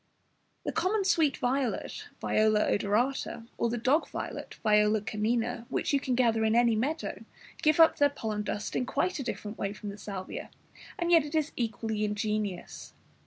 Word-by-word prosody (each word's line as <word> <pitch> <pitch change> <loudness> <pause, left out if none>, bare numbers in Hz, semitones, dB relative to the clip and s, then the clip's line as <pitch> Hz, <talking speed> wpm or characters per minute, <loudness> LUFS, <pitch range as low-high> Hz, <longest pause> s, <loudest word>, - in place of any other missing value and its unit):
The - - -1
common 395 +2 +1
sweet 315 -6 +3
violet 255 -1 -1
(Viola 215 0 +3
odorata) 230 +3 0
or 235 - +2
the 240 - -1
dog 260 +7 +2
violet - - -6
(Viola 210 0 +4
canina), 225 +3 -1
which - - -1
you 280 - +4
can 260 -2 -1
gather 230 -3 +3
in 220 0 +2
any 235 -1 +4
meadow, 290 +9 -2 0.4
give 310 +1 +3
up 325 - +7
their 290 0 +5
pollen 220 -7 -3
dust 210 0 -4
in 250 - 0
quite 365 +3 0
a - - -2
different 215 -3 -5
way 200 0 -2
from 210 0 -7
the 200 +1 -8
Salvia, 195 -3 -6 0.5
and 345 0 0
yet 330 -3 +7
it 295 +2 -6
is 310 -1 +1
equally 220 -2 -2
ingenious. 210 -3 -3
230 Hz, 170 wpm, -29 LUFS, 210-275 Hz, 0.5 s, up